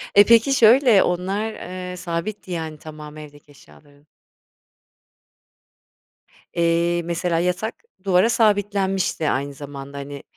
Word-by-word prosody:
E, 205 Hz, -, +9 dB
peki, 230 Hz, +4 st, +5 dB
şöyle, 235 Hz, -3 st, +6 dB
onlar, 195 Hz, +5 st, -2 dB
ııı, 180 Hz, 0 st, -7 dB
sabitti 180 Hz, +3 st, -5 dB
yani, 160 Hz, -2 st, -4 dB
tamamı 155 Hz, 0 st, -11 dB
evdeki 145 Hz, 0 st, -15 dB
eşyaların? 145 Hz, +1 st, -21 dB, 2.5 s
Eee, 170 Hz, 0 st, +1 dB
mesela 170 Hz, 0 st, -1 dB
yatak 180 Hz, +5 st, -2 dB, 0.3 s
duvara 190 Hz, +3 st, +3 dB
sabitlenmişti 200 Hz, -7 st, +1 dB
aynı 140 Hz, +1 st, -2 dB
zamanda, 140 Hz, 0 st, -9 dB
hani, 140 Hz, 0 st, -8 dB
175 Hz, 105 wpm, -22 LUFS, 150-200 Hz, 2.5 s, E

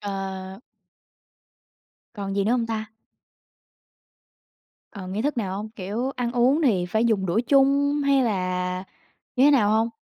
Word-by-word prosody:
À. 195 Hz, 0 st, -6 dB, 1.5 s
Còn 200 Hz, -2 st, -5 dB
gì 200 Hz, -, +1 dB
nữa 215 Hz, -, +1 dB
hông 240 Hz, -2 st, +1 dB
ta? 220 Hz, -1 st, -4 dB, 2.0 s
Ờ, 195 Hz, -3 st, -9 dB
nghi 200 Hz, +4 st, -3 dB
thức 290 Hz, +1 st, -1 dB
nào 195 Hz, -5 st, -2 dB
hông? 210 Hz, +2 st, -5 dB
Kiểu 220 Hz, +5 st, -4 dB
ăn 240 Hz, -1 st, -2 dB
uống 255 Hz, +5 st, +3 dB
thì 195 Hz, -, +2 dB
phải 220 Hz, +5 st, 0 dB
dùng 210 Hz, -5 st, +1 dB
đũa 185 Hz, +6 st, +1 dB
chung 280 Hz, +3 st, +3 dB
hay 275 Hz, -1 st, +3 dB
là 185 Hz, -4 st, -2 dB, 0.5 s
như 255 Hz, -, +3 dB
thế 290 Hz, -, +7 dB
nào 225 Hz, -8 st, +4 dB
hông? 220 Hz, +1 st, +2 dB
220 Hz, 150 wpm, -24 LUFS, 195-250 Hz, 2.0 s, thế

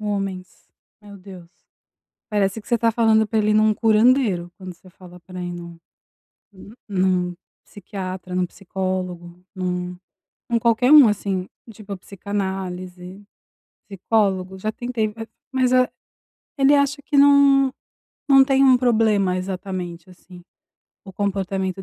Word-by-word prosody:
homens, 195 Hz, -3 st, -5 dB, 0.3 s
meu 200 Hz, -1 st, -12 dB
Deus, 185 Hz, -3 st, -13 dB, 0.8 s
parece 205 Hz, +1 st, 0 dB
que -, -, -22 dB
você 235 Hz, -, +1 dB
tá 230 Hz, 0 st, +2 dB
falando 220 Hz, -1 st, +3 dB
para 220 Hz, -, -2 dB
ele 210 Hz, 0 st, +1 dB
ir -, -, +2 dB
num 215 Hz, 0 st, +4 dB
curandeiro, 220 Hz, -5 st, +2 dB
quando 185 Hz, -2 st, -9 dB
você 185 Hz, +2 st, -19 dB
fala 180 Hz, -1 st, -15 dB
pra 185 Hz, +1 st, -10 dB
ele 175 Hz, -, -4 dB
ir -, -, -6 dB
num 170 Hz, -1 st, -9 dB, 0.8 s
hum, 195 Hz, +2 st, -14 dB, 0.2 s
num, 185 Hz, -2 st, 0 dB, 0.3 s
psiquiatra, 185 Hz, -2 st, -7 dB
num 180 Hz, -1 st, 0 dB
psicólogo, 180 Hz, -2 st, -5 dB
num 180 Hz, -1 st, -4 dB, 0.5 s
em 235 Hz, -, +2 dB
qualquer 240 Hz, +4 st, +2 dB
um 285 Hz, -7 st, +9 dB
assim, 195 Hz, -3 st, -2 dB, 0.2 s
tipo 200 Hz, -1 st, -8 dB
psicanálise, 190 Hz, -1 st, -6 dB, 0.7 s
psicólogo, 190 Hz, -2 st, -1 dB
já 215 Hz, +2 st, -2 dB
tentei, 230 Hz, -3 st, -3 dB, 0.4 s
mas 255 Hz, -1 st, +1 dB
a 255 Hz, 0 st, +4 dB, 0.7 s
ele 275 Hz, +2 st, +5 dB
acha 285 Hz, 0 st, +1 dB
que 290 Hz, -, -2 dB
não 280 Hz, -1 st, +5 dB, 0.6 s
não 270 Hz, -1 st, +7 dB
tem 270 Hz, 0 st, +3 dB
um 260 Hz, -2 st, +6 dB
problema 215 Hz, -6 st, +2 dB
exatamente 185 Hz, -2 st, -6 dB
assim, 180 Hz, 0 st, -15 dB, 0.6 s
o 190 Hz, -, -11 dB
comportamento 195 Hz, -1 st, -3 dB
195 Hz, 135 wpm, -21 LUFS, 185-225 Hz, 0.8 s, um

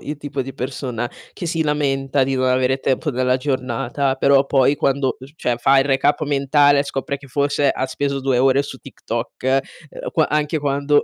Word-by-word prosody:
il 150 Hz, 0 st, -5 dB
tipo 145 Hz, -2 st, -4 dB
di 135 Hz, +1 st, -7 dB
persona 125 Hz, -2 st, -4 dB, 0.2 s
che 175 Hz, -, -6 dB
si 165 Hz, -1 st, 0 dB
lamenta 140 Hz, -2 st, 0 dB
di 135 Hz, +1 st, -1 dB
non 130 Hz, 0 st, +1 dB
avere 130 Hz, +1 st, +2 dB
tempo 135 Hz, +3 st, 0 dB
nella 125 Hz, -1 st, +1 dB
giornata 130 Hz, 0 st, -1 dB
però 140 Hz, +1 st, +4 dB
poi 135 Hz, 0 st, +3 dB
quando 135 Hz, -1 st, 0 dB
uhm, 130 Hz, -, -11 dB
f -, -, -21 dB
cioè 125 Hz, -5 st, -1 dB
fa 135 Hz, +3 st, +4 dB
il 135 Hz, -, +3 dB
recap 145 Hz, +2 st, +2 dB
mentale 145 Hz, 0 st, +3 dB
scopre 140 Hz, 0 st, -3 dB
che 140 Hz, -, -14 dB
forse 140 Hz, +1 st, +1 dB
ha 130 Hz, -, -2 dB
speso 140 Hz, +1 st, -2 dB
2 130 Hz, -2 st, +1 dB
ore 135 Hz, +2 st, +3 dB
su 140 Hz, -, -8 dB
TikTok, 130 Hz, +1 st, -2 dB, 0.3 s
uhm, -, -, -7 dB
qu 160 Hz, -, +2 dB
anche 150 Hz, +1 st, 0 dB
quando 145 Hz, 0 st, +1 dB
135 Hz, 195 wpm, -20 LUFS, 130-145 Hz, 0.3 s, però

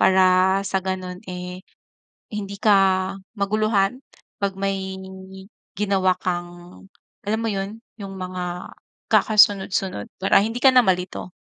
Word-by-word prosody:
Para 185 Hz, 0 st, +4 dB
sa 190 Hz, 0 st, 0 dB
gano'n, 185 Hz, -1 st, -4 dB
eh, 180 Hz, +1 st, -7 dB, 0.7 s
hindi 200 Hz, -1 st, -5 dB
ka 210 Hz, -2 st, +5 dB, 0.6 s
maguluhan 215 Hz, +2 st, +1 dB, 0.4 s
'pag 195 Hz, -1 st, 0 dB
may 195 Hz, -1 st, -2 dB, 0.8 s
ginawa 195 Hz, -2 st, +2 dB
kang 175 Hz, 0 st, -5 dB, 0.4 s
alam 215 Hz, +2 st, 0 dB
mo 230 Hz, -, -1 dB
'yon 200 Hz, +2 st, -4 dB, 0.2 s
'yong 195 Hz, -1 st, -7 dB
mga 180 Hz, -1 st, -5 dB, 0.4 s
kakasunod-sunod 195 Hz, -, +3 dB
para 190 Hz, -, +5 dB
hindi 225 Hz, +2 st, -3 dB
ka 265 Hz, -, +7 dB
na 250 Hz, -, +7 dB
malito. 180 Hz, -1 st, -1 dB
190 Hz, 115 wpm, -22 LUFS, 185-200 Hz, 0.8 s, ka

